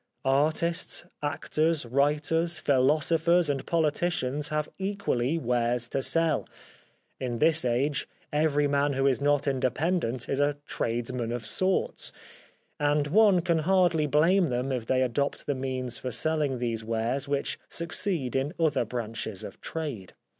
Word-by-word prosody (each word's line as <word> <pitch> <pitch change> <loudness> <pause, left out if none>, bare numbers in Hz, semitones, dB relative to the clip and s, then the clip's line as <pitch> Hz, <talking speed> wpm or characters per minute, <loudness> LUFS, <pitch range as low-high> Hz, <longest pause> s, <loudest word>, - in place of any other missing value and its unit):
Artists, 155 +7 +1 0.2
actors, 155 +1 0
writers, 150 +6 +1
philosophers 155 +4 +2
and 135 -2 -3
politicians 150 -3 0
have 150 0 -1
equally 190 -8 -1
wares 120 -3 0
to 135 - -1
sell 165 +1 +1 0.3
— - - -34 0.3
in 120 -2 -3
this 160 +4 +3
age 130 +4 0 0.3
every 150 -1 +2
man 140 0 +1
who 135 0 0
is 135 0 +2
not 145 0 +2
independent 130 -1 0
is 135 - -1
a 145 0 +1
tradesman 120 0 -2
of 120 -2 -4
sorts 185 - -1 0.3
— - - -30 0.3
and 145 0 +2
one 200 0 +5
can 170 -1 +1
hardly 175 -2 +3
blame 165 +5 +3
them 125 +2 -1
if 120 -3 -3
they 130 0 +2
adopt 140 +3 -1
the 145 - 0
means 130 -2 -3
for 130 - -4
selling 150 +1 0
these 115 -2 -2
wares 115 +5 -1
which 140 0 -2
succeed 170 -5 -2
in 140 +6 -1
other 155 -7 +2
branches 115 -3 -4
of - - -9
trade. 140 - -5
145 Hz, 145 wpm, -28 LUFS, 125-160 Hz, 0.3 s, one